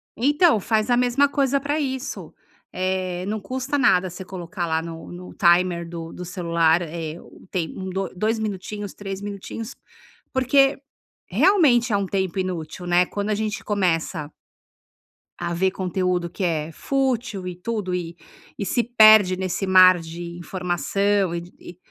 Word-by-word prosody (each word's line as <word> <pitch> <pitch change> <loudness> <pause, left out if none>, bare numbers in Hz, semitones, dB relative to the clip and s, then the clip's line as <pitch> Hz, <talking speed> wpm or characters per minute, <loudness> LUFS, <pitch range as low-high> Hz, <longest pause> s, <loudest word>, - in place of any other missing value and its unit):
Então, 290 +2 +4
faz 215 +3 0
a 245 - +4
mesma 250 +3 +3
coisa 280 -1 +1
pra 285 +2 -2
isso. 265 -3 -4 0.4
Eh, 185 -1 -2
não 215 0 -2
custa 260 +7 -3
nada 185 -9 +3
você 180 +2 -8
colocar 180 0 -5
lá 160 0 0
no 165 0 -8
no 180 +1 -10
timer 175 -2 +3
do 165 -1 -7
do 180 - -7
celular 170 -2 +1 0.4
o - - -17
tempo 185 +1 -3
do 190 +1 -3
2 215 +5 0
minutinhos, 205 -1 -5
3 195 -1 -6
minutinhos, 205 +3 -6 0.6
porque 270 +2 +3 0.5
realmente 255 - +4
é 200 - +4
um 200 - -1
tempo 190 -1 -2
inútil, 180 -2 -4
né? 175 +1 +4
Quando 205 +3 -4
a 210 - +2
gente 215 -1 -3
começa 170 -6 -1 1.1
a 170 0 -3
ver 190 +2 +1
conteúdo 180 -2 -1
que 190 - -4
é 160 -2 -1
fútil 245 - -1
e 180 - -6
tudo 205 0 -3
e 170 -1 -4 0.5
se 240 +4 +1
perde 215 -5 +6
nesse 190 +1 -2
mar 185 -1 +7
de 170 +1 -7
informação 185 +2 0
e 175 0 -9
190 Hz, 150 wpm, -23 LUFS, 175-220 Hz, 1.1 s, mar